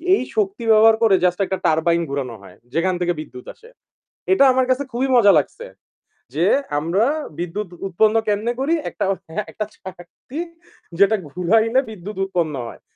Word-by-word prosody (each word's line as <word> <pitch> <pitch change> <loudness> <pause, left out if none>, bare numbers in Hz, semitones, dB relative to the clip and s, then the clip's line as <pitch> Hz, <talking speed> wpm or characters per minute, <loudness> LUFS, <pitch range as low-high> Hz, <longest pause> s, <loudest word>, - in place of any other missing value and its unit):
এই - - -2
শক্তি 205 +2 -1
ব্যবহার 220 +1 +6
করে 205 -4 +5
just 180 +1 +2
একটা 190 - -3
turbine 170 +2 +2
ঘুরানো 135 -4 -4
হয় 100 - -15 0.2
যেখান 185 +3 +1
থেকে 175 0 +1
বিদ্যুৎ 125 -5 -9
আসে। 465 0 -18 0.6
এটা 275 - +5
আমার 260 0 +2
কাছে 260 +2 +1
খুবই 255 +3 -1
মজা 205 -5 +6
লাগছে। - - -6 0.7
যে 170 +3 +2 0.3
আমরা 180 +9 +1 0.3
বিদ্যুৎ 185 +3 -4 0.2
উৎপন্ন 215 +4 +2
কেমনে 210 +3 0
করি 290 +5 +1 0.2
একটা, - - -3 0.5
একটা 215 - -4
চাকতি 190 - -10 0.6
যেটা 200 +2 +5
ঘুরাইলে 220 - +2
বিদ্যুৎ 210 0 -8
উৎপন্ন 170 -5 -1
হয়। - - -11
195 Hz, 155 wpm, -20 LUFS, 170-225 Hz, 0.7 s, ব্যবহার